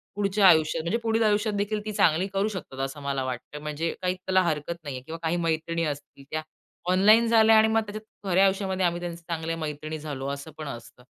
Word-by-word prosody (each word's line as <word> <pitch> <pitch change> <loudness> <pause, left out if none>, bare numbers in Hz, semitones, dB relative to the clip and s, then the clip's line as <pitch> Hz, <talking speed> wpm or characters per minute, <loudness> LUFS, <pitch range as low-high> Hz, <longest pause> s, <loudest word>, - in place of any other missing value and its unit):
पुढच्या 200 0 +3
आयुष्यात 160 -2 +4
म्हणजे 170 +8 0
पुढील 225 0 +2
आयुष्यात 210 0 +2
देखील 205 +1 -1
ती 215 - -3
चांगली 170 -1 +3
करू 195 +2 +1
शकतात 185 -10 -7
असं 135 +2 -8
मला 140 -1 -2
वाटतं. 130 +3 -5
म्हणजे 150 +2 -2
काही 180 0 0
त्याला 185 0 +1
हरकत 160 0 -1
नाही 140 -3 -5
आहे. 130 - -7
किंवा 165 +2 -7
काही 165 +1 +1
मैत्रिणी 165 0 -1
असतील 145 -2 -6
त्या 155 - -1 0.5
ऑनलाईन 215 +5 +6
झाल्या 225 -1 +6
आणि 220 0 +6
मग 220 0 +2
त्याच्यात 215 +1 -6 0.3
खऱ्या 185 +2 +4
आयुष्यामध्ये 190 -1 0
आम्ही 175 0 0
त्यांचे 170 -1 -5
चांगल्या 165 0 -2
मैत्रिणी 155 0 -4
झालो 140 -3 -5
असं 140 +3 -6
पण 155 -1 -6
असतं. 120 -1 -9
170 Hz, 210 wpm, -26 LUFS, 150-200 Hz, 0.5 s, ऑनलाईन